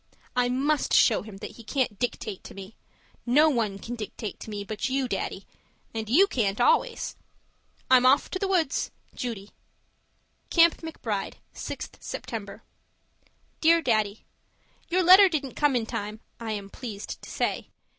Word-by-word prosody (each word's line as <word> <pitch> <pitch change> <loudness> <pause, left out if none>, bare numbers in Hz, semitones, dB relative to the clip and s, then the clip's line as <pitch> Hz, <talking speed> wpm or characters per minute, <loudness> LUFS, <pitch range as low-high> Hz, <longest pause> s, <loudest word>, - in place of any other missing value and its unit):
I 250 0 +2
MUST 280 +4 +1
show 225 - +5
him 210 -1 -10
that - - -9
he 230 - -11
can't 240 -4 -1
dictate 215 -5 -3
to - - -10
me. 195 +2 -10 0.5
No 295 +6 +5
one 220 -6 0
can 230 +4 -7
dictate 215 -2 -6
to - - -9
me 205 -1 -4
but 215 +4 -3
you, 265 0 0
Daddy - - -3 0.5
and 220 -1 -4
you 335 - +6
can't 215 - -1
always! 485 0 +2 0.7
I'm 255 -1 +6
off 265 +3 +5
for 370 - -4
the 390 - 0
woods. 350 -7 +1 0.2
Judy 215 -5 -5 1.0
CAMP 335 -1 +5
MCBRIDE, 230 -11 -4 0.2
6th - - -7
September - - -6 1.0
Dear 335 +1 +5
Daddy, 215 -4 0 0.6
Your 365 +2 +2
letter 375 +3 +9
didn't 285 -6 -2
come 295 -3 +2
in 235 -2 +1
time 210 0 -5 0.2
(I 225 -2 -3
am 200 -1 -6
pleased 215 -5 -7
to - - -11
say). - - -2
245 Hz, 155 wpm, -27 LUFS, 215-300 Hz, 1.0 s, letter